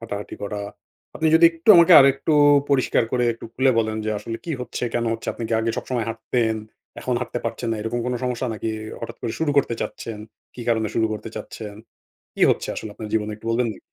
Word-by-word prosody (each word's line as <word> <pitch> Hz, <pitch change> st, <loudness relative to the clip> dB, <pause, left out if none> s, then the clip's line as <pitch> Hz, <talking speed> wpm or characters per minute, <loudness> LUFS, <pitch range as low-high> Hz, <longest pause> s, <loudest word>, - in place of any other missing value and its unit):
হাঁটাহাঁটি 105 Hz, -3 st, -6 dB
করা। 105 Hz, 0 st, -4 dB, 0.6 s
আপনি 160 Hz, -, 0 dB
যদি 165 Hz, +1 st, +6 dB
একটু 165 Hz, +3 st, -10 dB
আমাকে 170 Hz, +1 st, +7 dB
আরেকটু 140 Hz, +3 st, +3 dB, 0.4 s
পরিষ্কার 135 Hz, -4 st, +2 dB
করে 125 Hz, -1 st, +2 dB
একটু 115 Hz, -, -12 dB
খুলে 130 Hz, +1 st, +3 dB
বলেন 110 Hz, -1 st, 0 dB
যে 110 Hz, -, -1 dB
আসলে 115 Hz, +2 st, -5 dB
কি 170 Hz, -, -5 dB
হচ্ছে? 125 Hz, -, -6 dB
কেন 120 Hz, -, 0 dB
হচ্ছে? 115 Hz, -, -6 dB
আপনি -, -, -8 dB
কি -, -, -3 dB
আগে 115 Hz, -, 0 dB
সবসময় 120 Hz, -3 st, -2 dB
হাঁটতেন? 115 Hz, 0 st, -1 dB, 0.4 s
এখন 125 Hz, -, -1 dB
হাঁটতে 120 Hz, 0 st, -3 dB
পারছেন 115 Hz, -, -3 dB
না? 115 Hz, -, 0 dB
এরকম 115 Hz, +2 st, -2 dB
কোন 125 Hz, -, -1 dB
সমস্যা 125 Hz, 0 st, -2 dB
নাকি? 110 Hz, -, -4 dB, 0.3 s
হঠাৎ 115 Hz, 0 st, -7 dB
করে 115 Hz, -, -2 dB
শুরু 160 Hz, -2 st, +1 dB
করতে 120 Hz, -4 st, +1 dB
চাচ্ছেন? 115 Hz, -2 st, -5 dB, 0.4 s
কি 125 Hz, -, -9 dB
কারণে 110 Hz, -2 st, +1 dB
শুরু 110 Hz, -, +2 dB
করতে 110 Hz, +1 st, -6 dB
চাচ্ছেন? 105 Hz, -2 st, -7 dB, 0.6 s
কি -, -, -5 dB
হচ্ছে -, -, -3 dB
আসলে 110 Hz, -, -6 dB
আপনার 110 Hz, 0 st, -8 dB
জীবনে 110 Hz, -1 st, 0 dB
একটু 110 Hz, -, -16 dB
বলবেন 120 Hz, +1 st, +1 dB
নাকি? -, -, -15 dB
115 Hz, 210 wpm, -23 LUFS, 110-125 Hz, 0.6 s, আমাকে